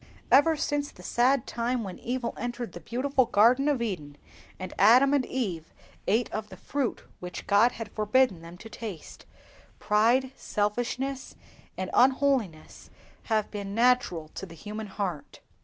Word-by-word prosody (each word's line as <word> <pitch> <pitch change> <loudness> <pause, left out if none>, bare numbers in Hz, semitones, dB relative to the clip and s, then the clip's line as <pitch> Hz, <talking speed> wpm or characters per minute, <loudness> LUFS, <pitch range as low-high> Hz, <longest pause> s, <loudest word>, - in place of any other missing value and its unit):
Ever 310 +3 +5
since 290 -1 -1
the 180 - -15
sad 245 +5 +2
time 235 +1 -2
when 190 -3 -7
evil 245 0 -3
entered 240 -1 -5
the - - -9
beautiful 260 +2 0
garden 240 +5 +4
of 265 -5 0
Eden, 150 -10 -5 0.4
and 185 - -6
Adam 260 +5 +6
and 280 -2 +3
Eve 185 -11 -3 0.4
ate 225 +4 +2
of 215 0 -4
the - - -11
fruit 275 -4 -3 0.2
which 180 0 -7
God 215 +4 +4
had 225 -3 -7
forbidden 215 -3 +2
them 170 +1 -11
to 225 - -11
taste, 215 -7 -9 0.5
pride, 235 +5 +2
selfishness, 245 +6 -2 0.4
and 185 0 -4
unholiness 260 - +1 0.4
have 215 -2 0
been 200 -1 -5
natural 235 -10 +2
to 195 - -8
the 165 - -12
human 210 +5 -7
heart. 190 -7 -5
230 Hz, 150 wpm, -27 LUFS, 200-255 Hz, 0.5 s, Adam